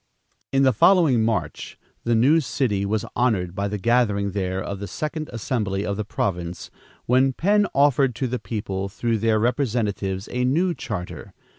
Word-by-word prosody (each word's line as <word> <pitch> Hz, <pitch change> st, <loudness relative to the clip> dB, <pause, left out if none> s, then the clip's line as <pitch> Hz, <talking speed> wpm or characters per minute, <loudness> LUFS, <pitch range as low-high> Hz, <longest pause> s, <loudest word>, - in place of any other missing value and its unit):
In 135 Hz, 0 st, +3 dB
the 130 Hz, -1 st, +4 dB
following 150 Hz, -, +4 dB
March, 105 Hz, -10 st, -2 dB, 0.3 s
the 120 Hz, 0 st, +2 dB
new 135 Hz, +8 st, +5 dB
city 110 Hz, -9 st, -1 dB
was 110 Hz, +1 st, -1 dB
honored 100 Hz, -8 st, +1 dB
by 100 Hz, +1 st, -2 dB
the 105 Hz, +1 st, -3 dB
gathering 105 Hz, -2 st, +1 dB
there 95 Hz, -1 st, -2 dB
of 100 Hz, 0 st, -5 dB
the 100 Hz, -, -5 dB
second 155 Hz, +2 st, -4 dB
assembly 105 Hz, -4 st, -2 dB
of 100 Hz, -, -2 dB
the 105 Hz, -, -3 dB
province, 90 Hz, -4 st, -3 dB, 0.3 s
when 130 Hz, +2 st, +3 dB
Penn 205 Hz, +7 st, +2 dB
offered 140 Hz, -3 st, +3 dB
to 135 Hz, -, -2 dB
the 125 Hz, 0 st, -2 dB
people, 100 Hz, -2 st, -4 dB
through 115 Hz, +2 st, -1 dB
their 110 Hz, 0 st, +2 dB
representatives 110 Hz, -5 st, -1 dB
a 125 Hz, 0 st, -1 dB
new 170 Hz, +8 st, +2 dB
charter. 95 Hz, -, -6 dB
115 Hz, 165 wpm, -23 LUFS, 100-130 Hz, 0.3 s, new